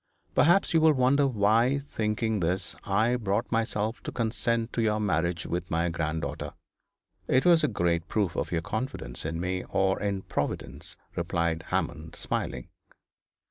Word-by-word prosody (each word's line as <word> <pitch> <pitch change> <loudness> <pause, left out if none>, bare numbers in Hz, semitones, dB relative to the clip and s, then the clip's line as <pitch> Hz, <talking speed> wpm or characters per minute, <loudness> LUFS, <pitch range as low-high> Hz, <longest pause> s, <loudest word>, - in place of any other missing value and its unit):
Perhaps 175 +5 +4
you 165 - +5
will 160 -1 +6
wonder 135 +2 +3
why, 115 +3 +3
thinking 110 -5 -1
this, 90 +2 -1
I 110 +5 +2
brought 110 +1 -1
myself 110 0 0
to - - -5
consent 115 0 -1
to 115 - 0
your 110 -1 +2
marriage 85 -4 0
with 90 0 -3
my 85 +1 +1
granddaughter.' 80 -1 -3 0.7
'It 130 - +3
was 170 -3 +6
a - - +4
great 85 - 0
proof 100 -6 0
of - - -2
your 85 -1 0
confidence 110 - -3
in 80 0 -3
me, 90 +1 -2
or 95 0 +2
in 100 -2 -1
Providence,' - - -3 0.2
replied 85 -2 -1
Hammond, 80 -1 -2
smiling. 60 - -3
105 Hz, 150 wpm, -28 LUFS, 85-120 Hz, 0.7 s, will